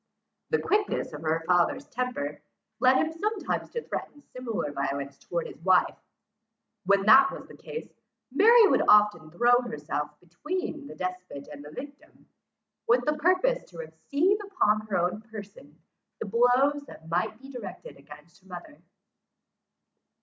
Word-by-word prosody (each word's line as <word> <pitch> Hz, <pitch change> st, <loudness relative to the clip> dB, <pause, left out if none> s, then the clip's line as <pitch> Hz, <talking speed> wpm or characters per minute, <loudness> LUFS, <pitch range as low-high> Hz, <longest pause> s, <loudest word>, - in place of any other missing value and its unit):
The 460 Hz, -, +2 dB
quickness 415 Hz, -, -1 dB
of 150 Hz, -, -7 dB
her 160 Hz, +1 st, 0 dB
father's 180 Hz, -, +2 dB
temper, 245 Hz, -, -4 dB, 0.4 s
led 255 Hz, +2 st, +5 dB
him 320 Hz, -, +1 dB
sometimes 410 Hz, +5 st, -3 dB
to 470 Hz, -, -5 dB
threaten 290 Hz, -, -6 dB
similar 230 Hz, -11 st, -3 dB
violence 140 Hz, 0 st, -4 dB
towards 170 Hz, -1 st, -4 dB
his -, -, -17 dB
wife. 185 Hz, 0 st, +3 dB, 0.9 s
When 200 Hz, 0 st, +4 dB
that 265 Hz, +6 st, +7 dB
was -, -, -9 dB
the -, -, -13 dB
case, 465 Hz, -, -8 dB, 0.4 s
Mary 450 Hz, -, +7 dB
would -, -, +3 dB
often 210 Hz, -6 st, +5 dB
throw 240 Hz, +8 st, +4 dB
herself 150 Hz, -9 st, -5 dB
between 300 Hz, -, -5 dB
the -, -, -10 dB
despot 185 Hz, -6 st, -6 dB
and 145 Hz, -1 st, -10 dB
his 150 Hz, +1 st, -12 dB
victim, 285 Hz, +1 st, -11 dB, 0.6 s
with 245 Hz, +1 st, +3 dB
the 300 Hz, -, +2 dB
purpose 370 Hz, +10 st, +2 dB
to -, -, -14 dB
receive 390 Hz, -, 0 dB
upon 215 Hz, -, +1 dB
her 205 Hz, -, 0 dB
own 180 Hz, +4 st, -1 dB
person 205 Hz, -8 st, -12 dB, 0.4 s
the -, -, -5 dB
blows 245 Hz, +7 st, +3 dB
that 160 Hz, -, -13 dB
might 175 Hz, +6 st, -1 dB
be 270 Hz, +1 st, -12 dB
directed 235 Hz, -7 st, -9 dB
against 150 Hz, +6 st, -16 dB
her 190 Hz, -, -24 dB
mother. 180 Hz, -, -10 dB
220 Hz, 150 wpm, -27 LUFS, 170-290 Hz, 0.9 s, that